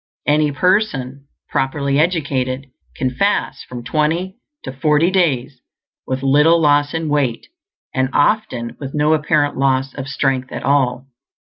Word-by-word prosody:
Any 150 0 +2
person, 140 -6 0 0.2
properly 140 +1 0
educated, 140 -6 0 0.3
can 130 -1 -1
fast 200 +11 -1
from 120 -1 -8
twenty 165 - -1 0.2
to 130 - -5
forty 150 +5 +2
days 140 -9 0 0.5
with 130 +1 -3
little 150 +5 +4
loss 145 -1 +2
in 165 -1 -2
weight, 140 -6 0 0.5
and 130 0 0
often 145 - 0
with 135 0 -6
no 150 +1 +3
apparent 150 -1 +1
loss 135 -1 +1
of 135 -1 -6
strength 135 -1 -1
at - - -6
all. 135 -2 +1
145 Hz, 135 wpm, -18 LUFS, 130-155 Hz, 0.5 s, little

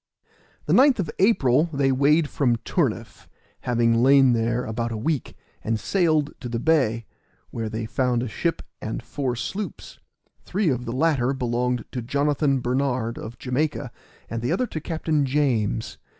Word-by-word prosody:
The - - +1
9th 270 -1 +6
of 180 -7 -2
April 155 - +4
they 140 -2 +1
weighed 145 +4 +3
from 130 -4 +1
Turniff, - - -2 0.3
having 115 -1 +2
lain 135 -1 +6
there 115 +2 0
about 115 +2 -3
a 110 - -3
week, 140 +5 -2 0.3
and 110 0 -1
sailed 155 - +1
to 125 - -6
the 115 - -2
bay, 120 -5 +1 0.5
where 115 -2 -3
they 110 +1 -4
found 125 +1 0
a - - -3
ship 165 +9 -2 0.2
and 110 - -4
four 130 -4 -3
sloops; 195 - -6 0.4
three 195 -1 0
of 125 -2 -1
the 115 - -4
latter 135 -2 +1
belonged 125 -1 -1
to 125 - -3
Jonathan 140 +2 +1
Bernard, 125 -2 -1
of 115 +1 -8
Jamaica, 130 0 -2 0.4
and 115 0 -4
the 120 - -1
other 255 - +1
to 160 -9 -6
Captain 160 -2 0
James. 120 -7 0
130 Hz, 160 wpm, -24 LUFS, 115-150 Hz, 0.5 s, 9th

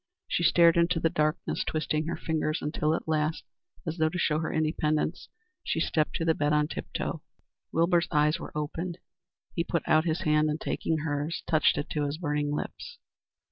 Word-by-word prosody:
She - - 0
stared 170 0 +5
into 170 0 +3
the 165 0 +1
darkness, 155 +1 0
twisting 155 0 -1
her 170 - -2
fingers, 155 -1 -1
until 150 +1 0
at - - -5
last, 155 0 0 0.4
as 165 0 -3
though 155 0 +3
to 180 - -5
show 155 -3 +1
her 165 - -2
independence, 155 +1 0 0.3
she - - -1
stepped 155 -2 0
to 165 - -1
the 165 - +4
bed 150 -1 +1
on 150 0 +3
tip - - -6
toe. - - -3 0.5
Wilbur's 170 +1 +3
eyes 150 +2 +2
were - - -7
open. 165 +4 -3 0.6
He 170 - 0
put 170 -1 -1
out 155 +1 +4
his 160 0 0
hand, 150 0 +3
and, 150 +1 -2
taking 160 -1 -1
hers, 145 +2 -2
touched 155 -4 +3
it 145 - -2
to 150 -2 0
his 145 +2 -3
burning 150 -3 -1
lips. 150 - -5
155 Hz, 190 wpm, -28 LUFS, 150-165 Hz, 0.6 s, stared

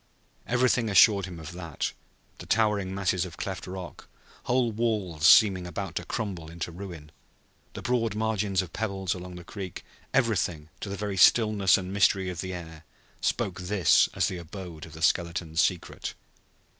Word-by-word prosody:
Everything 120 -1 +2
assured 100 -1 +6
him 90 -2 -8
of 80 0 -8
that; 85 -3 -4 0.5
the - - -9
towering 105 -4 +2
masses 90 -2 +1
of 85 -3 -8
cleft 95 -2 -5
rock, 90 -1 -8 0.4
whole 125 -1 +2
walls 105 -8 0
seeming 95 -5 +6
about 90 +1 -5
to 90 - -4
crumble 95 -7 -4
into 85 +1 -5
ruin, 85 -4 -9 0.6
the - - -8
broad 115 -4 0
margins 105 -3 0
of 85 - -11
pebbles 100 -4 -2
along 90 0 -8
the 90 - -9
creek 95 0 -7 0.3
everything, 90 - 0
to 100 - -5
the 100 - -4
very 100 -1 -3
stillness 105 -3 +5
and 95 0 -5
mystery 95 -2 +3
in - - -6
the 95 +3 -4
air, 80 -3 -8 0.4
spoke 90 -1 -1
this 90 -2 +4
as - - +2
the 90 - -3
abode 85 -2 -8
of 80 - -14
the 80 0 -7
skeletons' 85 -2 +1
secret. 90 -3 -2
95 Hz, 165 wpm, -27 LUFS, 85-105 Hz, 0.6 s, assured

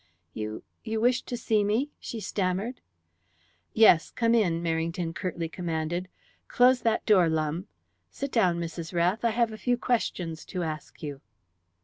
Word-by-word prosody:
"You 110 0 -5 0.2
you 220 -1 -2
wished 245 +2 +2
to 245 - -3
see 220 -2 +2
me?" 225 +8 0
she 230 - -6
stammered. 200 +4 -2 0.9
"Yes. 215 -7 +6
Come 230 0 +1
in." 185 -8 +3
Merrington 165 +1 -1
curtly 170 -1 -3
commanded. 170 +1 -3 0.4
"Close 250 0 +4
that 225 -1 +1
door, 185 -6 +5
Lumbe. 160 +3 -1 0.4
Sit 275 -1 -5
down, 180 -7 +3
Mrs. 170 +1 -5
Rath, 180 +6 +2
I 235 - +4
have 230 0 +1
a 215 - -8
few 245 -1 +1
questions 180 -10 -1
to 180 - -3
ask 155 -1 -6
you." 145 -2 -5
185 Hz, 150 wpm, -28 LUFS, 165-230 Hz, 0.9 s, Yes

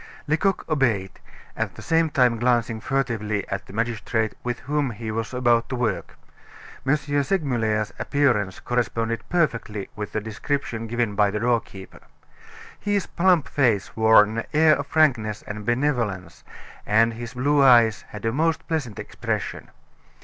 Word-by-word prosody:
Lecoq 170 +5 0
obeyed, 120 -11 0 0.4
at - - -3
the - - -10
same 165 0 +2
time 125 -5 +2
glancing 120 -2 +1
furtively 110 -5 -2
at 95 - -4
the - - -11
magistrate 115 0 -1
with 120 -1 -2
whom 145 -1 -1
he 115 -1 -5
was 115 0 -3
about 120 -2 +2
to 130 - -2
work. 120 -5 -2 0.7
M. 145 - +4
Segmuller's 140 - -1
appearance 120 -10 +1
corresponded 115 -1 -1
perfectly 115 - -1
with 105 -1 -5
the 110 - 0
description 115 +2 -3
given 120 -2 -1
by 105 0 +3
the 105 +1 -2
doorkeeper. 115 -5 -2 0.8
His 205 -2 0
plump 175 -4 +2
face 115 -8 +1
wore 110 -1 +6
an 110 +2 -3
air 155 0 +5
of 145 0 -5
frankness 120 -10 +1
and 105 0 -7
benevolence, 120 -7 -1 0.4
and 115 +2 +3
his 115 +1 -8
blue 145 +3 +2
eyes 120 -5 +5
had 105 +1 -8
a 115 - +1
most 160 +5 0
pleasant 145 -10 -3
expression. - - -4
120 Hz, 145 wpm, -24 LUFS, 110-140 Hz, 0.8 s, wore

